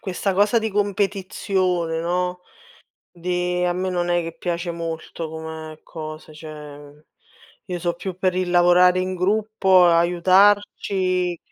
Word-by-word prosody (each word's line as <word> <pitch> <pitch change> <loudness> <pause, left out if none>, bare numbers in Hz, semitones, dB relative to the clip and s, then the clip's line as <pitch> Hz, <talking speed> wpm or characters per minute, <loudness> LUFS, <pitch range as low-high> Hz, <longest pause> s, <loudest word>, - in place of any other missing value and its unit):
questa 190 0 -2
cosa 205 +4 +3
di 220 -1 -2
competizione, 190 -4 -1
no, 180 +1 -2 0.7
di 180 0 -2
a 175 0 +1
me 185 +1 -2
non 175 -1 -1
è 175 0 +2
che 165 0 -7
piace 170 0 -3
molto 165 -1 -6
come 160 0 -8
cosa, 155 -1 -9
cioè 150 -1 -11 0.6
io 180 -2 -4
so' 170 0 -1
più 185 +1 -6
per 185 -1 0
il 185 -1 -1
lavorare 180 +1 +5
in 185 0 -2
gruppo, 195 -1 +3
aiutarci. 185 +1 +2
180 Hz, 130 wpm, -22 LUFS, 165-185 Hz, 0.7 s, lavorare